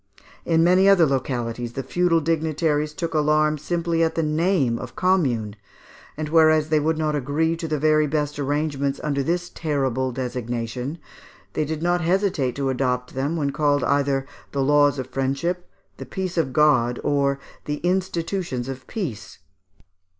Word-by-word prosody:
In 165 -1 +3
many 185 +3 +5
other 185 -4 +6
localities 120 -3 -2
the 135 - -4
feudal 170 +4 +2
dignitaries 155 -1 0
took 165 +1 -4
alarm 150 0 +2
simply 170 +2 -1
at 165 -1 +1
the 165 - +1
name 155 -6 +1
of 125 - -8
Commune, 130 - +1 0.6
and 155 0 -3
whereas 155 -1 +4
they 155 -1 +3
would 155 +2 0
not 155 -1 0
agree 145 +4 0
to 165 - -4
the 155 -1 -1
very 155 +1 +3
best 150 0 -2
arrangements 140 -1 -1
under 140 -2 0
this 175 +5 -1
terrible 135 -5 -1
designation, 125 +2 -4 0.6
they 155 - 0
did 160 +1 -4
not 175 0 +2
hesitate 170 - +1
to 135 -1 -1
adopt 125 -1 -1
them 140 +5 -1
when 145 -4 0
called 145 -1 +1
either 140 -1 +1 0.3
the 140 -1 +1
"laws 145 0 +4
of 130 - -3
friendship," 140 +8 -2 0.3
the - - -7
"peace 185 -2 -4
of 160 -6 0
God," 125 -5 +3
or 140 -1 +1 0.3
the 150 0 -2
"institutions 175 -7 -1
of 130 -1 -7
peace." 115 - -5
150 Hz, 155 wpm, -23 LUFS, 135-165 Hz, 0.6 s, other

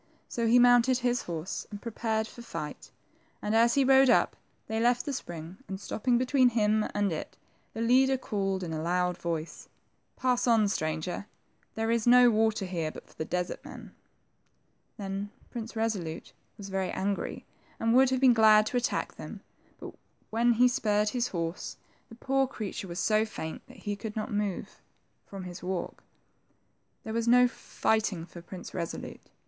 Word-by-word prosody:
So 235 -1 -1
he 235 +2 +6
mounted 245 +1 +6
his 245 -1 0
horse 170 +1 -5
and 205 - -7
prepared 220 -1 -2
for 240 - -12
fight, 235 - -7 0.5
and 210 - -2
as 235 +1 +4
he 280 - +4
rode 265 0 +6
up, - - +4 0.3
they 220 0 -2
left 245 +1 +2
the 285 - -2
spring, 170 -6 -7
and 190 -1 -5
stopping 240 +4 0
between 255 0 +4
him 215 -2 +2
and 205 -2 +1
it, 155 - -6 0.4
the 225 - -3
leader 265 +3 +4
called 195 -6 -2
in 165 -2 -4
a 155 - -3
loud 180 +1 0
voice, 165 -2 -5 0.5
Pass 250 -1 +1
on,, 225 -3 +4
stranger. 160 +2 -2 0.5
There 225 +1 0
is 235 0 +1
no 245 0 +7
water 220 -2 +1
here 170 -4 -2
but - - -11
for - - -19
the 160 - -4
desert 180 +1 -3
men." - - -11 1.0
Then 195 0 -4 0.2
Prince 230 -2 -6
Resolute 200 -8 -3 0.2
was 200 -1 -8
very 190 -1 -1
angry, 195 +1 -3 0.3
and 225 0 +2
would 260 +1 +6
have 260 -1 +1
been 260 -2 +7
glad 215 -2 +6
to 245 - -1
attack 245 - -1
them, - - -8 0.4
but - - -8 0.4
when 235 +2 +3
he 245 +2 +5
spurred 210 -3 +1
his 245 +1 -1
horse, 165 -1 -4 0.3
the 230 - -11
poor 270 +2 +1
creature 205 -5 -5
was 175 +1 -5
so 215 +4 +3
faint 160 -7 -6
that - - -15
he 205 -1 -4
could 210 +1 -7
not 215 -1 -3
move 205 -2 -3 0.5
from 195 -2 -7
his 180 -1 -8
walk. 180 0 -4 1.0
There 220 - -5
was 230 0 -1
no 250 +1 +6
fighting 215 -7 -1
for 170 0 -11
Prince 180 +1 -9
Resolute. 170 -2 -6
215 Hz, 175 wpm, -29 LUFS, 185-240 Hz, 1.0 s, no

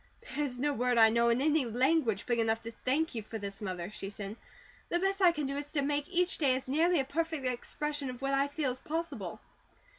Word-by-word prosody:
"There's 285 -4 -1
no 290 +3 +1
word 250 -1 +1
I 225 -1 +8
know 235 +1 +3
in 235 +2 +2
any 305 0 +3
language 245 -2 +2
big 240 -1 +1
enough 225 0 +1
to 230 - -5
thank 285 +7 0
you 225 - -3
for 220 +1 -6
this, 200 -1 -6
Mother," 185 -2 -4
she 195 -2 -6
said. 205 0 -6 0.5
"The 345 - +2
best 390 +2 0
I 360 -2 +7
can 300 -3 -3
do 275 +1 -2
is 290 +2 -6
make 290 +1 0
each 360 -1 +1
day 270 -5 +4
as 260 - -4
nearly 325 +5 +3
a 270 - +1
perfect 320 -1 -2
expression 280 +3 -2
of 250 -1 -7
what 275 0 -1
I 275 +1 +3
feel 285 -2 -1
as 255 - -7
possible." 330 +4 -4
270 Hz, 230 wpm, -31 LUFS, 235-300 Hz, 0.5 s, I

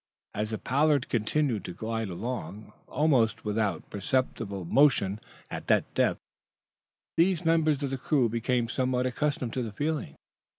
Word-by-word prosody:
As 105 +1 -2
the 110 - -2
"Pollard" 145 +2 +2
continued 120 -1 0
to 90 - -6
glide 115 -1 -3
along, 105 +1 -5
almost 120 -7 +2
without 105 -1 -1
perceptible 100 -3 -1
motion 110 - +3 0.3
at - - -6
that - - +2
depth, - - +2 1.0
these 175 0 +3
members 155 -3 +3
of 135 - -2
the 135 - -3
crew 130 -2 +2
became 115 +1 0
somewhat 125 +1 0
accustomed 130 -2 -1
to 130 - -1
the 115 -3 -4
feeling. 145 - -2
125 Hz, 140 wpm, -28 LUFS, 110-145 Hz, 1.0 s, motion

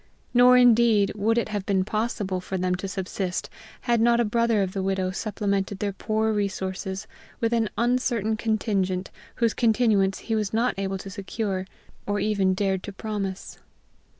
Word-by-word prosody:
Nor, 250 +1 +7
indeed, 235 -4 +5
would 220 +3 +1
it 235 - 0
have 205 -2 -2
been 190 -2 +2
possible 215 -4 -2
for 190 +1 -4
them 180 0 0
to 180 +2 -3
subsist 190 -1 -3 0.3
had 235 -2 +1
not 235 0 +4
a 240 - +3
brother 230 -1 +2
of 185 -1 -4
the 195 - -2
widow 190 -1 0
supplemented 200 -1 -2
their 200 0 -2
poor 220 +2 0
resources 190 -1 -3 0.3
with 230 0 0
an 225 -2 +1
uncertain 235 -3 +1
contingent, 200 -4 -1 0.2
whose 230 -2 +1
continuance 220 -5 +2
he 225 - -4
was 215 -1 -1
not 235 +3 +2
able 195 0 -2
to 195 +1 -8
secure, 195 -1 -3 0.4
or 205 0 0
even 195 -3 +1
dared 190 -1 0
to 205 - -7
promise. 195 -2 -5
205 Hz, 165 wpm, -25 LUFS, 190-225 Hz, 0.4 s, Nor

